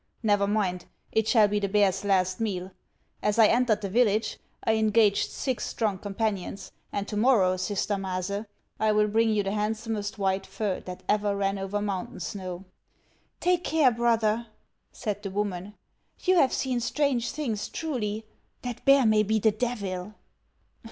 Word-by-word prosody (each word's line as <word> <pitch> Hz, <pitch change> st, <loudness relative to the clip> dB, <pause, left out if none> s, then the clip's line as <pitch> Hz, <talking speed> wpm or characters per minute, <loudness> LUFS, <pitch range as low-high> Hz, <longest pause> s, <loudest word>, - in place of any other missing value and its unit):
Never 205 Hz, -2 st, +3 dB
mind; 190 Hz, -4 st, 0 dB, 0.3 s
it 220 Hz, -1 st, +1 dB
shall 220 Hz, -2 st, +5 dB
be 205 Hz, 0 st, 0 dB
the 200 Hz, -1 st, -1 dB
bear's 195 Hz, -1 st, +2 dB
last 185 Hz, -2 st, +1 dB
meal. 190 Hz, -4 st, -2 dB, 0.5 s
As 210 Hz, +1 st, 0 dB
1 220 Hz, -2 st, +7 dB
entered 235 Hz, -3 st, +2 dB
the 200 Hz, -, -2 dB
village 220 Hz, -1 st, +2 dB, 0.2 s
I 225 Hz, -, +2 dB
engaged 215 Hz, -1 st, +3 dB
six 260 Hz, -3 st, -3 dB
strong 210 Hz, -5 st, -1 dB
companions, 200 Hz, -1 st, -3 dB, 0.2 s
and 200 Hz, 0 st, -3 dB
to 210 Hz, -, -5 dB
morrow, 210 Hz, -5 st, +4 dB
sister 200 Hz, +2 st, -1 dB
Maase, 195 Hz, +2 st, -3 dB, 0.3 s
I 215 Hz, -1 st, +3 dB
will 210 Hz, 0 st, +3 dB
bring 225 Hz, +2 st, +2 dB
you 210 Hz, -2 st, +2 dB
the 195 Hz, -, -2 dB
handsomest 215 Hz, 0 st, -2 dB
white 195 Hz, -1 st, 0 dB
fur 195 Hz, 0 st, -2 dB
that 180 Hz, 0 st, -9 dB
ever 205 Hz, -1 st, +1 dB
ran 195 Hz, 0 st, 0 dB
over 195 Hz, +2 st, -2 dB
mountain 195 Hz, -3 st, -4 dB
snow." 185 Hz, 0 st, -5 dB, 0.4 s
" -, -, -39 dB, 0.3 s
Take 360 Hz, 0 st, +2 dB
care, 305 Hz, -5 st, +4 dB
brother," 230 Hz, -1 st, +1 dB, 0.4 s
said 210 Hz, -3 st, -4 dB
the 200 Hz, -, -4 dB
woman; 200 Hz, 0 st, -3 dB, 0.2 s
" -, -, -31 dB
you 370 Hz, -, +4 dB
have 270 Hz, -6 st, +5 dB
seen 255 Hz, -2 st, -1 dB
strange 250 Hz, -1 st, 0 dB
things, 235 Hz, -9 st, -3 dB
truly. 225 Hz, -9 st, -3 dB, 0.4 s
That 245 Hz, -2 st, -5 dB
bear 275 Hz, -2 st, +6 dB
may 215 Hz, -1 st, +5 dB
be 215 Hz, +1 st, +1 dB
the 220 Hz, +1 st, +3 dB
Devil." 210 Hz, -4 st, -3 dB
210 Hz, 165 wpm, -27 LUFS, 195-225 Hz, 0.5 s, 1